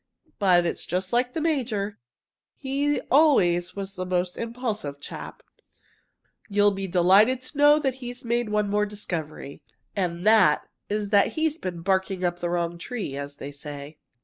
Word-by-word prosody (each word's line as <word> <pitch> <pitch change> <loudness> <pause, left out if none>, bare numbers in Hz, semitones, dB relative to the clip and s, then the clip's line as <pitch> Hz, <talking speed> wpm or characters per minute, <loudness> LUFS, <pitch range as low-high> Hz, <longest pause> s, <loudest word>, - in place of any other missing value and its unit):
But 180 -4 +4
it's 170 - -2
just 185 +3 -2
like 250 +1 +1
the 320 - -2
major. 225 -10 -1 0.6
He 280 +1 0
always 180 - +4
was 195 -1 -5
the 185 -1 -4
most 180 0 -1
impulsive 225 - -4
chap. - - -9 1.1
You'll 205 0 +4
be 195 0 -4
delighted 190 +8 +4
to 270 - -9
know 290 +1 +7
that 275 -4 0
he's 245 0 -7
made 235 -1 0
one 210 0 +1
more 210 +1 +1
discovery 160 -8 -6 0.3
and 175 -2 -2
that 215 -9 +5 0.2
is 205 -1 -2
that 200 -2 +4
he 315 - -2
has 320 0 0
been 175 -2 -5
'barking 190 0 0
up 175 0 0
the 175 - -2
wrong 170 0 -2
tree,' 205 - -5
as 140 0 -6
they 140 0 -7
say. 145 +1 -9
200 Hz, 165 wpm, -25 LUFS, 175-240 Hz, 1.1 s, know